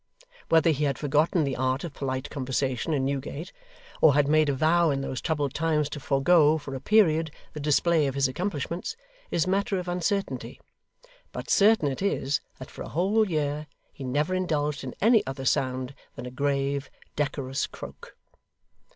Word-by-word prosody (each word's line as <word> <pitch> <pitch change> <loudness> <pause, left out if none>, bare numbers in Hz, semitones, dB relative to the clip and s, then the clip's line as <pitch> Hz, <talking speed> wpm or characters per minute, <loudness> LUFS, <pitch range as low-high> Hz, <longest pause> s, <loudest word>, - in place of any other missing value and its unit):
Whether 165 0 +5
he 150 0 0
had 140 -2 0
forgotten 150 +3 +2
the 140 -2 -1
art 130 +1 0
of 170 -4 -6
Polite 130 -1 -4
Conversation 130 0 -2
in 135 -3 +1
Newgate, 140 +3 -4 0.5
or 150 -3 +6
had 145 -1 +3
made 155 0 +4
a - - +2
vow 165 +4 +3
in 135 -1 0
those 130 -2 -4
troubled 145 -5 -1
times 155 -2 +1
to 150 - -6
forego, 150 +3 +4
for 140 -3 -7
a 135 - -4
period, 165 -4 +3 0.2
the 150 - -6
display 150 +1 +2
of 135 - -3
his 140 -1 +3
accomplishments, 170 - -3 0.3
is 165 - +1
matter 195 +1 0
of 180 -1 -4
uncertainty; 180 +3 -2 0.7
but - - -6
certain 205 -6 +5
it 135 +3 -3
is 145 -8 0 0.2
that 130 - -10
for - - -10
a - - -6
whole 200 +5 +2
year 150 -1 -1 0.3
he 140 - -9
never 145 +7 0
indulged 150 -6 -1
in 130 - -6
any 225 0 +5
other 135 0 -5
sound 130 0 0 0.2
than - - -7
a 125 - -6
grave, 140 0 -1 0.3
decorous 140 -2 -2
croak. - - -11
145 Hz, 175 wpm, -27 LUFS, 135-170 Hz, 0.7 s, or